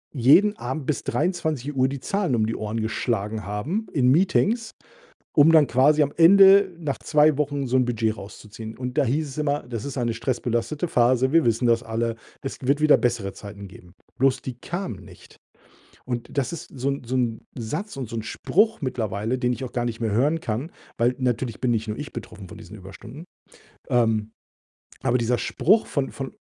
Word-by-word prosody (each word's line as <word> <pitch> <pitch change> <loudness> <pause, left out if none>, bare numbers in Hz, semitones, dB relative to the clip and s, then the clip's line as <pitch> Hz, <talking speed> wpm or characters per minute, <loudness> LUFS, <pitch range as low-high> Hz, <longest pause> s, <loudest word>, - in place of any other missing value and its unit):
jeden 180 - +5
Abend 130 +3 -5
bis 150 - -1
23:00 150 -6 -1
die 135 0 -5
Zahlen 190 -4 -1
um 110 -2 +1
die 115 - -2
Ohren 110 +1 -3
geschlagen 110 -1 -2
haben 130 - -3
in 125 -4 +3
Meetings, 195 - +2 0.6
um 150 +2 +6
dann 155 -3 +6
quasi 145 +5 +4
am 145 - 0
Ende 195 +2 +7
nach 150 -5 -3
2 150 -1 +3
Wochen 145 -2 -1
so 125 +1 +1
'n 125 -1 +3
Budget 110 -2 -1
rauszuziehen. 110 +2 -10
Und 125 +2 -5
da 145 - +4
hieß 145 +4 -1
es 135 - -9
immer: 145 -1 0
„Das 115 -3 -5
ist 140 - -6
eine 120 -2 0
stressbelastete 120 +6 -2
Phase. 125 0 +2
Wir 165 0 +4
wissen 115 +2 +1
das 115 0 +3
alle. 115 0 -2 0.3
Es 135 - -5
wird 140 +3 +1
wieder 155 -1 +6
bessere 115 -6 -1
Zeiten 100 -1 -10
geben.“ 90 -2 -15 0.3
Bloß 130 0 +2
die 130 - -5
kamen 145 - -5
nicht. - - -16 0.7
Und 120 -2 -4
das 140 +3 0
ist 170 - -8
so 135 +3 0
'n 140 -1 -3
so 125 +2 -4
'n 120 -3 0 0.2
Satz 150 - -5
und 130 -3 -4
so 115 - -6
'n 110 - -2
Spruch 210 - +1
mittlerweile, 115 -2 -2
den 125 -1 +1
ich 130 - -6
auch 125 - -6
gar 120 -1 -2
nicht 115 -1 -4
mehr 115 -2 -1
hören 145 +9 +1
kann, 125 +7 -3 0.3
weil 120 +2 +2
natürlich 125 -3 -2
bin 125 -2 0
nicht 110 -1 -1
nur 105 - -4
ich 145 +2 -7
betroffen 95 -2 -9
von 105 - -11
diesen 105 -1 -11
Überstunden. 100 - -11 0.6
Ähm, 110 -2 +1 0.7
aber 125 -1 +2
dieser 120 +1 +1
Spruch 210 +7 +2
von 140 -2 -2
von 135 -1 -7
125 Hz, 195 wpm, -24 LUFS, 115-150 Hz, 0.7 s, Ende